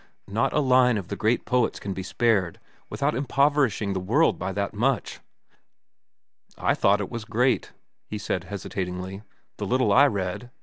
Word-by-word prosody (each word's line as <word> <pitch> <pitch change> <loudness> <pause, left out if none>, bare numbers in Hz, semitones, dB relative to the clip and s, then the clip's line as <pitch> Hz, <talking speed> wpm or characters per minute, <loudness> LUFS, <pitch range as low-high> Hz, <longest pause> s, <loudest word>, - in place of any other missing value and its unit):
Not 110 +4 0
a 150 - +2
line 125 -3 +4
of 95 -3 -6
the 100 - -3
great 110 +4 0
poets 125 -2 +1
can 100 - -4
be 95 - -5
spared 95 -2 0 0.3
without 140 +2 -1
impoverishing 135 -6 +1
the 95 - -2
world 110 - +2
by 95 +2 -3
that 100 0 -2
much." 125 +5 -1 1.4
"I - - +1
thought 100 +1 +2
it 100 - -5
was 115 -2 -5
great," 120 +3 0 0.4
he 105 - -5
said 95 -3 -3
hesitatingly, 95 -1 -5 0.4
"the - - -4
little 130 +1 +2
I 140 +3 +7
read. 100 +1 -3
110 Hz, 165 wpm, -25 LUFS, 95-125 Hz, 1.4 s, I